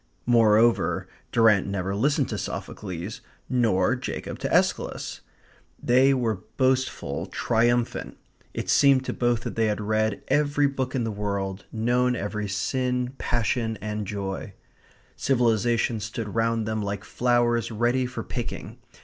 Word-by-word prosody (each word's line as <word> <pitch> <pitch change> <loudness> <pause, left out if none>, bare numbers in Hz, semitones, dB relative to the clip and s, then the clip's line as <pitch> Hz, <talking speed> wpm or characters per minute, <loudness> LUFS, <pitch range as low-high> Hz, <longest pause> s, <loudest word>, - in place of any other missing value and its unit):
Moreover, 115 -1 +4 0.2
Durrant 110 -5 +4
never 95 -1 -2
listened 140 +9 +1
to - - -3
Sophocles, 95 +1 -5 0.3
nor 115 -3 +2
Jacob 130 - -5
to - - -3
Aeschylus. - - 0 0.6
They 130 +3 +4
were 115 -7 0 0.2
boastful, 130 -1 0
triumphant; 120 +1 0 0.3
it - - -4
seemed 135 -2 +5
to - - -2
both 120 -2 +1
that - - -5
they 115 -1 +2
had 105 0 -1
read 110 0 0
every 145 0 +2
book 135 -1 -1
in 125 - 0
the 115 - -2
world; 100 -2 -3
known 120 +2 +1
every 105 -1 -3
sin, 125 +4 -1
passion, 115 -1 0
and 105 -1 -4
joy. 100 0 -4 0.6
Civilizations 120 -3 +1
stood 110 -1 -5
round 115 -1 +1
them 110 0 -1
like 100 0 -3
flowers 120 -1 +1
ready 120 +3 +1
for 130 - -5
picking. - - -6
115 Hz, 130 wpm, -25 LUFS, 105-125 Hz, 0.6 s, seemed